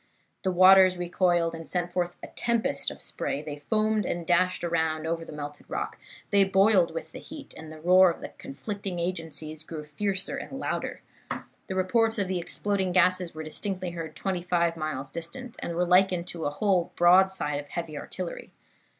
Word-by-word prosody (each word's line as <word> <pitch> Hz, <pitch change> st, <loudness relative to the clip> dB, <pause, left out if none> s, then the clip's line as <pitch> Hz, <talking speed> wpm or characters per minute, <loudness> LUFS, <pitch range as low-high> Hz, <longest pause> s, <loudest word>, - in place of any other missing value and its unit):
The 190 Hz, -, 0 dB
waters 185 Hz, 0 st, +7 dB
recoiled, 175 Hz, -1 st, +1 dB
and 165 Hz, -1 st, -7 dB
sent 175 Hz, -1 st, -1 dB
forth 175 Hz, -1 st, -1 dB
a -, -, -5 dB
tempest 235 Hz, -1 st, 0 dB
of -, -, -10 dB
spray; 145 Hz, -, -3 dB
they 150 Hz, -1 st, -6 dB
foamed 215 Hz, -1 st, +2 dB
and 175 Hz, -2 st, -3 dB
dashed 180 Hz, +1 st, +2 dB
around 160 Hz, -2 st, 0 dB
and -, -, -7 dB
over 165 Hz, 0 st, -1 dB
the -, -, -10 dB
melted 145 Hz, -1 st, -8 dB
rock, -, -, -4 dB, 0.3 s
they 200 Hz, -1 st, +6 dB
boiled 195 Hz, -2 st, +4 dB
with 160 Hz, -1 st, -6 dB
the -, -, -8 dB
heat, 300 Hz, -2 st, -10 dB
and 155 Hz, 0 st, -9 dB
the 155 Hz, -, -10 dB
roar 180 Hz, +3 st, +6 dB
of 170 Hz, -, -4 dB
the -, -, -6 dB
conflicting 195 Hz, +5 st, -5 dB
agencies 160 Hz, -3 st, -4 dB
grew 160 Hz, -1 st, -7 dB
fiercer 190 Hz, +6 st, -2 dB
and -, -, -6 dB
louder. -, -, -3 dB, 0.6 s
The 190 Hz, -, -4 dB
reports 225 Hz, +5 st, +2 dB
of 200 Hz, -2 st, 0 dB
the 185 Hz, -1 st, -1 dB
exploding 190 Hz, +1 st, -1 dB
gases 185 Hz, -2 st, +3 dB
were 160 Hz, -, -5 dB
distinctly 185 Hz, +3 st, -3 dB
heard 165 Hz, -3 st, -6 dB
twenty 185 Hz, -1 st, -2 dB
five 170 Hz, -1 st, +1 dB
miles 155 Hz, -4 st, -4 dB
distant, 225 Hz, -, -7 dB
and 170 Hz, -, -4 dB
were 175 Hz, +1 st, +2 dB
likened 180 Hz, -1 st, +4 dB
to 165 Hz, -2 st, -5 dB
a -, -, +2 dB
whole 180 Hz, +2 st, +1 dB
broadside 175 Hz, -4 st, +4 dB
of 145 Hz, -, -8 dB
heavy 165 Hz, 0 st, -5 dB
artillery. 175 Hz, +4 st, -6 dB
175 Hz, 185 wpm, -27 LUFS, 160-190 Hz, 0.6 s, waters